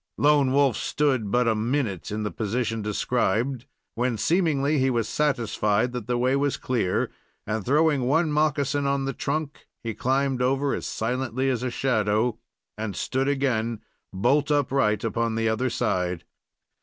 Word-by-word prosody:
Lone 145 -2 +4
Wolf 140 -2 +3
stood 130 -8 0
but 120 +3 +2
a 115 - +4
minute 110 - -1
in 105 +1 -3
the 105 - -2
position 115 +1 -2
described, 120 +3 -1 0.3
when, 120 -1 -1
seemingly, 155 - +1
he 130 0 +2
was 115 -3 0
satisfied 115 -5 0
that 120 -3 -5
the 125 -1 0
way 130 +2 +2
was 140 0 0
clear, 115 -8 -1 0.3
and, 110 -1 -2
throwing 145 0 +2
one 160 +3 +2
moccasin 145 -2 +1
on 140 -1 0
the 135 - -2
trunk, 150 +3 -4 0.2
he 115 -1 -3
climbed 135 +2 0
over 135 +2 +1
as - - -3
silently 130 +3 -1
as 125 - -2
a 130 - -1
shadow, 110 -2 0 0.4
and 105 -3 -3
stood 130 +7 -1
again 120 -5 0 0.3
holt 140 +10 +2
upright 135 -7 +1
upon 115 0 -1
the 115 0 0
other 110 +4 0
side. 90 -6 -1
125 Hz, 155 wpm, -25 LUFS, 110-140 Hz, 0.4 s, Lone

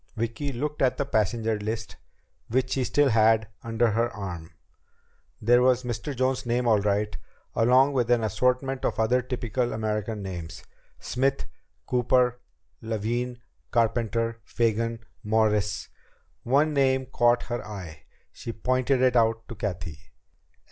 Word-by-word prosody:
Vicki 115 +5 -2
looked 150 +4 -4
at 130 -2 +2
the 140 - 0
passenger 110 -2 0
list 110 +2 -4 0.5
which 130 +3 0
she 135 - +1
still 145 +2 +3
had 110 -1 +4
under 115 0 +1
her 115 +2 +1
arm. 90 -6 -7 0.9
There 120 +3 +4
was 130 0 +3
Mr. 125 +4 -4
Jones's 130 0 0
name 120 +1 +1
all 110 -2 +5
right, 105 +1 0 0.4
along 130 +4 +4
with 125 -3 +1
an 120 -2 +3
assortment 125 +5 0
of - - -1
other 125 +3 +3
typical 125 -1 -2
American 105 -1 -2
names: 85 -4 -7 0.4
Smith, 135 +2 -1 0.4
Cooper, 125 0 +2 0.4
Levin, 120 +2 -3 0.3
Carpenter, 115 0 0
Fagan, 115 0 -1 0.2
Morris... 105 -2 +1 0.5
One 145 +5 +2
name 130 -2 +2
caught 120 -1 +2
her 120 -1 -4
eye. 90 -7 -9 0.3
She 115 - -7
pointed 130 +2 +1
it 125 -1 +3
out 115 -1 +2
to - - -5
Cathy. 90 -7 -5
115 Hz, 135 wpm, -26 LUFS, 110-125 Hz, 0.9 s, all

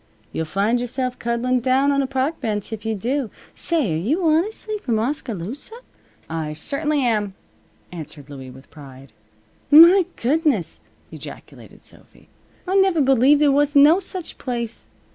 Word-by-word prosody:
You'll 160 - -3
find 200 +9 0
yourself 250 +1 -3
cuddling 240 +2 0
down 265 +3 +2
on 280 0 +1
a 270 - -2
park 270 +4 -2
bench 215 -2 -3
if 220 0 -6
you 220 - -1
do. 245 +4 -2 0.2
Say, 305 - -1
are - - -1
you 280 - -1
honestly 410 +7 0
from 235 - -1
Oskaloosa?" 235 - -4 0.5
"I 160 -2 -4
certainly 295 - -1
am," 210 -5 0 0.6
answered 155 -4 -8
Louie, 135 -3 -10
with 130 +2 -15
pride. 135 -3 -14 0.6
"My 340 +5 +8
goodness!" 275 - 0 0.3
ejaculated - - -12
Sophy. - - -17 0.4
"I 380 +2 +1
never 385 -4 +3
believed 270 +1 +4
there 290 -2 +4
was 290 +1 +1
no 295 +6 +6
such 370 -2 -6
place. 235 -3 -5
255 Hz, 145 wpm, -21 LUFS, 205-295 Hz, 0.6 s, My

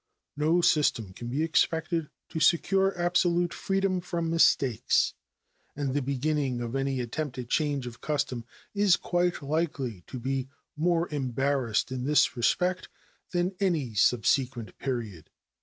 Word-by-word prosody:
No 160 +4 +2
system 115 - +2
can 120 +4 -8
be 135 +6 -1
expected 165 0 +1 0.2
to 160 - -4
secure 190 +3 +3
absolute 175 0 +2
freedom 195 -1 0
from 170 -2 -2
mistakes, 135 -7 +3 0.6
and 140 -2 -2
the 145 - +1
beginning 140 -1 -1
of 120 +1 -4
any 135 -1 -1
attempted 125 0 -5
change 145 -4 0
of 120 -1 -9
custom 140 -5 -2 0.3
is 200 -3 +4
quite 175 -3 0
likely 140 - -2
to 130 - -6
be 135 +1 -2 0.3
more 170 +2 +1
embarrassed 135 -3 0
in 130 -1 -3
this 150 +1 +3
respect 180 +9 0 0.4
than 180 +2 0
any 165 - 0
subsequent 125 +2 +1
period. 115 - -4
145 Hz, 130 wpm, -28 LUFS, 125-170 Hz, 0.6 s, is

